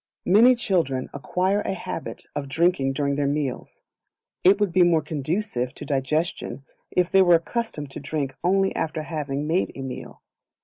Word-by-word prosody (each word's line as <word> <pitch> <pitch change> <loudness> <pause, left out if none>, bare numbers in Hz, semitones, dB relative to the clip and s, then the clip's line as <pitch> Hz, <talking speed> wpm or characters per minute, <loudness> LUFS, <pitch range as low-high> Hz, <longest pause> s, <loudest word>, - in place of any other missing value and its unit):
Many 230 +7 +6
Children 165 - -1
acquire 185 +8 0
a 195 - -2
Habit 165 - -6
of 140 -2 -4
Drinking 150 -3 +2
during 140 0 0
their 145 -1 +1
meals; 140 -3 -3 0.6
it 190 +3 +6
would 205 -3 +1
be 185 - +4
more 170 -3 +4
conducive 150 - -2
to - - -8
digestion 140 -1 -2 0.2
if 180 -1 +1
they 195 - +6
were 175 -2 +6
accustomed 165 - -3
to - - -7
drink 140 -1 -3
only 195 +2 +2
after 160 -1 -2
having 150 -3 -3
made 170 +5 0
a 135 - -6
meal. 130 -1 -8
155 Hz, 165 wpm, -24 LUFS, 140-185 Hz, 0.6 s, Many